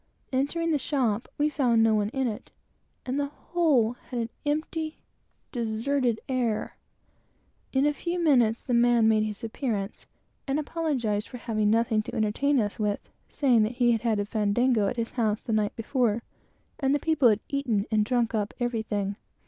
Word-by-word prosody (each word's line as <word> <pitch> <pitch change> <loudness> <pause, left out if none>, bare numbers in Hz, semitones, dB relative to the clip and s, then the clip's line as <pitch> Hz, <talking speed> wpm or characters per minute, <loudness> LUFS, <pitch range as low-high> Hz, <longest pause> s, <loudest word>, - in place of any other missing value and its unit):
Entering 325 +6 0
the 300 - +2
shop, 250 -6 0
we 295 - +3
found 245 -7 +2
no 225 -1 +4
one 210 -1 +1
in 265 +3 -1
it, 215 -3 -5 0.6
and 260 +3 -1
the 285 - 0
whole 290 -6 +1 0.2
had 250 - -4
an 230 0 -2 0.2
empty, 310 +1 -2 0.5
deserted 235 +1 0
appearance. 245 -5 -1 1.0
In 265 +1 +2
a 295 - +3
few 345 +4 -3
minutes 245 -9 +3
the 250 - -2
man 235 -1 +4
made 220 -1 +4
his 215 0 -3
appearance, 220 -3 -3 0.4
and 275 +1 0
apologized 270 -10 -1
for 250 - -8
having 215 -3 0
nothing 225 0 +2
to 240 +3 -7
entertain 245 +6 +1
us 205 -1 -2
with, 210 -1 -2 0.2
saying 250 -6 +3
that 215 +3 +1
he 240 -1 +3
had 225 -2 +1
had 225 -3 +1
a 205 - 0
fandango 215 +1 +2
at 245 - -3
his 230 -1 -2
house 220 -3 0
the 225 - -2
night 210 -1 +1
before, 235 -1 0 0.6
and 275 0 +2
the - - +1
people 300 -5 +3
had 210 -1 +2
eaten 245 -8 0
and 215 -1 +3
drunk 235 0 0
up 210 -2 -1
everything. 220 -4 -2
235 Hz, 175 wpm, -27 LUFS, 215-275 Hz, 1.0 s, no